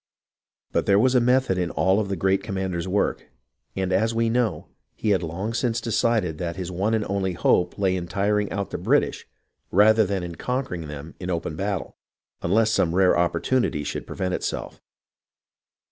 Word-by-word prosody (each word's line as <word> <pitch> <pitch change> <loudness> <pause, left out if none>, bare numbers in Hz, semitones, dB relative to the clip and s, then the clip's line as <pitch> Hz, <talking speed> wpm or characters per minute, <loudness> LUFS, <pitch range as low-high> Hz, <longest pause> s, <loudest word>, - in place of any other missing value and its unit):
But - - 0
there 100 - +5
was 125 +4 +4
a 125 - +4
method 125 -6 +2
in 90 -2 0
all 95 +3 +2
of 105 -2 -2
the 100 - -1
great 95 +2 +1
commander's 95 -4 -3
work; 100 +2 0 0.5
and, 95 -1 -1
as 110 +4 +1
we 115 0 +1
know, 120 -2 0 0.3
he 110 - 0
had 95 -3 +2
long 95 +7 -4
since 120 -1 0
decided 110 -7 0
that 85 -1 -3
his 90 -2 -5
one 100 +5 0
and 105 -2 -1
only 95 -1 -1
hope 90 +1 +2
lay 95 -2 +1
in 90 -2 -4
tiring 105 +2 0
out 100 0 -3
the - - -4
British - - +1 0.4
rather 110 +3 +5
than 95 -2 -2
in 85 -1 -5
conquering 110 - -3
them 75 +2 -8
in 90 - -5
open 85 -3 -2
battle, 100 +1 -3 0.4
unless 110 +5 +2
some 85 -5 +1
rare 95 -1 +5
oppor 85 0 +1
tunity 120 - 0
should - - -4
present 90 -1 -3
itself. - - -4
95 Hz, 185 wpm, -24 LUFS, 90-110 Hz, 0.5 s, there